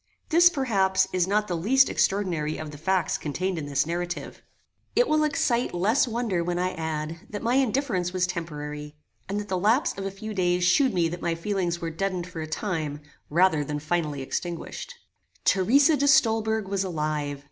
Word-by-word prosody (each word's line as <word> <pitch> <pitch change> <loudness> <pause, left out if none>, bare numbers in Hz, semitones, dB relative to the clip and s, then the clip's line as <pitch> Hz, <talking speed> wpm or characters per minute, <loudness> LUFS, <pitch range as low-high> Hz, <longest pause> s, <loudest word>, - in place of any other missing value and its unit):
This, 345 +1 +7
perhaps, 195 - +1
is 180 -1 +2
not 210 +2 +1
the 175 - -2
least 260 +11 +4
extraordinary 175 -6 0
of 155 -1 -6
the 145 - -10
facts 185 +2 0
contained 180 +4 -2
in 145 - -5
this 140 0 +1
narrative. 175 +2 -4 0.5
It - - +4
will 305 -3 +3
excite 250 -7 0
less 215 +10 +2
wonder 225 -7 -1
when 175 0 -2
I 180 +1 0
add, 160 0 -4
that 205 0 -6
my 235 +2 +1
indifference 255 -8 +1
was 185 -1 +1
temporary, 150 -4 -6 0.3
and 200 +1 -1
that 205 - -6
the 185 -2 -1
lapse 225 +9 +2
of 195 - -3
a - - -2
few 215 +3 -7
days 180 -2 +1
shewed 255 +7 +3
me 170 -2 +3
that 175 +1 -6
my 170 -1 0
feelings 175 -1 -2
were 165 -1 -3
deadened 185 +1 -2
for 170 -2 -7
a 155 - -5
time, 155 -5 -3 0.3
rather 165 -1 +3
than 150 +1 -3
finally 150 -2 -2
extinguished. 175 - -5 0.5
Theresa 275 - +4
de 285 0 +1
Stolberg 220 -6 +3
was 195 0 -1
alive. 150 -5 -2
185 Hz, 185 wpm, -26 LUFS, 165-220 Hz, 0.5 s, This